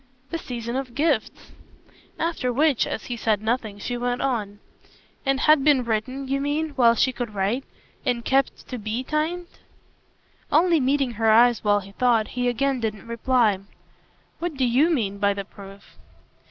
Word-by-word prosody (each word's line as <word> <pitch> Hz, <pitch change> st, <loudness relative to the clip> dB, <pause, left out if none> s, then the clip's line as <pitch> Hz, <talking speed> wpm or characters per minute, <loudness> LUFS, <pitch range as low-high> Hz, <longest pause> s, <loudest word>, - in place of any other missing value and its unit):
"The 330 Hz, -, -2 dB
season 235 Hz, -4 st, -5 dB
of 255 Hz, -3 st, -5 dB
gifts!" 315 Hz, +3 st, -1 dB, 0.7 s
After 325 Hz, -7 st, -1 dB
which, 285 Hz, 0 st, +2 dB
as -, -, -4 dB
he 245 Hz, -, -4 dB
said 220 Hz, -2 st, +1 dB
nothing, 220 Hz, -1 st, -2 dB
she 245 Hz, +4 st, -4 dB
went 245 Hz, 0 st, -1 dB
on: 215 Hz, -6 st, -2 dB, 0.7 s
"And 270 Hz, 0 st, +2 dB
had 305 Hz, -2 st, +5 dB
been 285 Hz, -3 st, +4 dB
written, 255 Hz, +5 st, -2 dB
you 275 Hz, +1 st, -1 dB
mean, 295 Hz, +3 st, -1 dB
while 245 Hz, -5 st, +4 dB
she 260 Hz, +3 st, +2 dB
could 240 Hz, -4 st, -5 dB
write, 205 Hz, +7 st, 0 dB, 0.4 s
and 245 Hz, -4 st, -1 dB
kept 270 Hz, +1 st, 0 dB
to 250 Hz, -, -5 dB
BE 220 Hz, +4 st, -3 dB
so -, -, -21 dB
timed?" 335 Hz, +3 st, -1 dB, 1.0 s
Only 335 Hz, +1 st, +4 dB
meeting 270 Hz, -1 st, +1 dB
her 225 Hz, -, +4 dB
eyes 235 Hz, +1 st, +5 dB
while 205 Hz, -1 st, +3 dB
he 195 Hz, +1 st, -12 dB
thought, 230 Hz, 0 st, +2 dB
he 245 Hz, 0 st, -2 dB
again 265 Hz, +2 st, 0 dB
didn't 215 Hz, -3 st, -4 dB
reply. 230 Hz, -3 st, +1 dB, 0.8 s
"What 340 Hz, -2 st, -3 dB
do 265 Hz, -1 st, +1 dB
YOU 260 Hz, +7 st, +3 dB
mean 210 Hz, -, -1 dB
by 200 Hz, 0 st, +2 dB
the 200 Hz, -1 st, -5 dB
proof?" 200 Hz, 0 st, -13 dB
245 Hz, 170 wpm, -24 LUFS, 220-275 Hz, 1.0 s, had